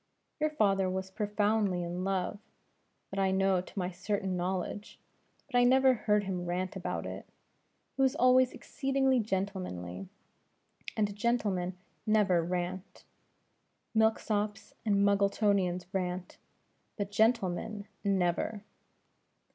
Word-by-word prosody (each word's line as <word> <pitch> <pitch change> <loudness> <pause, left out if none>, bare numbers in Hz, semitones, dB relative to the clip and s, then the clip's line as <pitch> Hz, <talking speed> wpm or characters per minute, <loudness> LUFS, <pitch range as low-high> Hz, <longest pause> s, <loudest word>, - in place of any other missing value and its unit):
Your 305 0 +2
father 195 -9 +2
was 190 0 -3
profoundly 205 -2 +1
in 175 +1 -3
love 195 +1 -1 0.7
that 195 - -3
I 195 -1 +3
know 190 -1 +2
to 185 - -15
my 180 -1 -1
certain 190 +1 -2
knowledge 185 +3 -3 0.5
but 275 - -8
I - - +5
never 260 +1 +6
heard 210 -3 +1
him 180 -2 -3
rant 180 +1 -2
about - - -3
it. - - -7 0.7
He - - -1
was 265 -1 +3
always 255 0 +5
exceedingly 270 -2 0
gentlemanly: 185 - -3 0.9
and 205 -2 0
gentlemen 205 -5 0 0.3
never 205 -5 +3
rant. 180 +2 -4 0.9
Milk 220 0 +4
sops 210 -1 -2
and 200 -2 +3
Muggletonians 200 -2 +2
rant, 180 -1 -3 0.6
but 205 -1 -3
gentlemen 210 -2 +1 0.2
never." 195 +1 0
200 Hz, 115 wpm, -31 LUFS, 185-215 Hz, 0.9 s, never